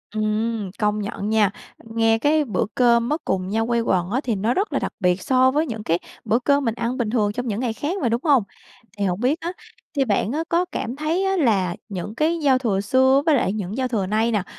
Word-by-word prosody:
Ừm, 215 Hz, -1 st, -1 dB
công 210 Hz, -1 st, +1 dB
nhận 205 Hz, 0 st, -4 dB
nha. 215 Hz, -2 st, +3 dB, 0.3 s
Nghe 225 Hz, 0 st, +1 dB
cái 300 Hz, +4 st, +2 dB
bữa 210 Hz, -8 st, -1 dB
cơm 235 Hz, -1 st, +3 dB
á, 300 Hz, -, +1 dB
cùng 185 Hz, -1 st, -1 dB
nhau 225 Hz, +2 st, 0 dB
quây 235 Hz, -1 st, +1 dB
quần 180 Hz, -5 st, 0 dB
á, 250 Hz, +6 st, 0 dB
thì 235 Hz, -4 st, -1 dB
nó 215 Hz, +5 st, 0 dB
rất 400 Hz, +8 st, -1 dB
là -, -, +1 dB
đặc -, -, -4 dB
biệt 180 Hz, -1 st, +1 dB
so 260 Hz, +4 st, +3 dB
với 300 Hz, +4 st, +1 dB
những 225 Hz, -7 st, -5 dB
cái 165 Hz, -1 st, +1 dB, 0.3 s
bữa 230 Hz, -, +2 dB
cơm 280 Hz, +2 st, +2 dB
mình 230 Hz, -1 st, 0 dB
ăn 240 Hz, +1 st, -2 dB
bình 235 Hz, -4 st, -1 dB
thường 210 Hz, -3 st, +1 dB
trong 245 Hz, +3 st, -4 dB
những 215 Hz, -1 st, -2 dB
ngày 240 Hz, -3 st, -1 dB
khác 305 Hz, -, -3 dB
mà, 245 Hz, -, +1 dB
đúng 235 Hz, +2 st, 0 dB
hông? 280 Hz, -8 st, +4 dB, 0.5 s
Thì 200 Hz, -, 0 dB
hổng 180 Hz, 0 st, -1 dB
biết 265 Hz, +8 st, +1 dB
á 340 Hz, -, -3 dB, 0.4 s
thì 275 Hz, -2 st, +2 dB
bạn 210 Hz, -1 st, 0 dB
á 310 Hz, +4 st, -1 dB
có 345 Hz, +2 st, +2 dB
cảm 250 Hz, -8 st, -4 dB
thấy 315 Hz, +6 st, -1 dB
á 385 Hz, 0 st, +1 dB
là 195 Hz, -, +2 dB
những 200 Hz, +2 st, -5 dB
cái 325 Hz, +5 st, +1 dB
giao 275 Hz, -4 st, +3 dB
thừa 215 Hz, -7 st, 0 dB
xưa 260 Hz, +6 st, +3 dB
với 315 Hz, -3 st, +4 dB
lại 205 Hz, -7 st, +1 dB
những 210 Hz, +1 st, -4 dB
giao 260 Hz, -1 st, 0 dB
thừa 220 Hz, -6 st, -1 dB
nay 220 Hz, +3 st, +1 dB
nè, 210 Hz, -4 st, 0 dB
230 Hz, 250 wpm, -22 LUFS, 210-265 Hz, 0.5 s, hông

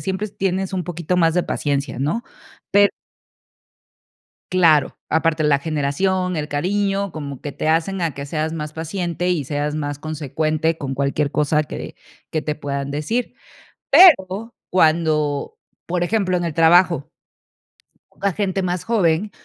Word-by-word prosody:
siempre 190 Hz, +2 st, -2 dB
tienes 190 Hz, -1 st, -2 dB
un 185 Hz, -1 st, -1 dB
poquito 175 Hz, +1 st, -2 dB
más 165 Hz, -2 st, +3 dB
de 180 Hz, -, +1 dB
paciencia, 140 Hz, -2 st, -2 dB
¿no? 210 Hz, -, -1 dB, 0.5 s
Per 205 Hz, 0 st, +6 dB, 1.6 s
claro, 160 Hz, -6 st, +4 dB
aparte 160 Hz, 0 st, +1 dB
la 145 Hz, -2 st, +3 dB
generación, 165 Hz, +5 st, -1 dB
el 150 Hz, -1 st, -3 dB
cariño, 195 Hz, +6 st, 0 dB
como 140 Hz, -4 st, -6 dB
que 145 Hz, -, -5 dB
te 155 Hz, -, -3 dB
hacen 170 Hz, +4 st, +1 dB
a 165 Hz, -3 st, 0 dB
que 140 Hz, 0 st, -6 dB
seas 155 Hz, +2 st, -2 dB
más 150 Hz, -2 st, -5 dB
paciente 175 Hz, +2 st, -3 dB
y 160 Hz, -6 st, 0 dB
seas 145 Hz, +2 st, -2 dB
más 145 Hz, -2 st, -3 dB
consecuente 155 Hz, +1 st, -1 dB
con 135 Hz, -1 st, -4 dB
cualquier 140 Hz, +1 st, 0 dB
cosa 150 Hz, +1 st, +1 dB
que -, -, -7 dB, 0.4 s
que 155 Hz, -, -1 dB
te 150 Hz, -, -2 dB
puedan 140 Hz, -1 st, -4 dB
decir. 155 Hz, +13 st, -2 dB, 0.6 s
Pero 235 Hz, -, +6 dB, 0.2 s
cuando, 155 Hz, -4 st, +1 dB, 0.3 s
por 175 Hz, 0 st, 0 dB
ejemplo, 185 Hz, -2 st, +1 dB
en 175 Hz, -, -1 dB
el 165 Hz, -3 st, -3 dB
trabajo, 165 Hz, -3 st, +4 dB, 1.1 s
la 200 Hz, -2 st, +2 dB
gente 195 Hz, -1 st, -1 dB
más 180 Hz, -1 st, -2 dB
joven, 205 Hz, -3 st, +1 dB
165 Hz, 145 wpm, -21 LUFS, 150-185 Hz, 1.6 s, Per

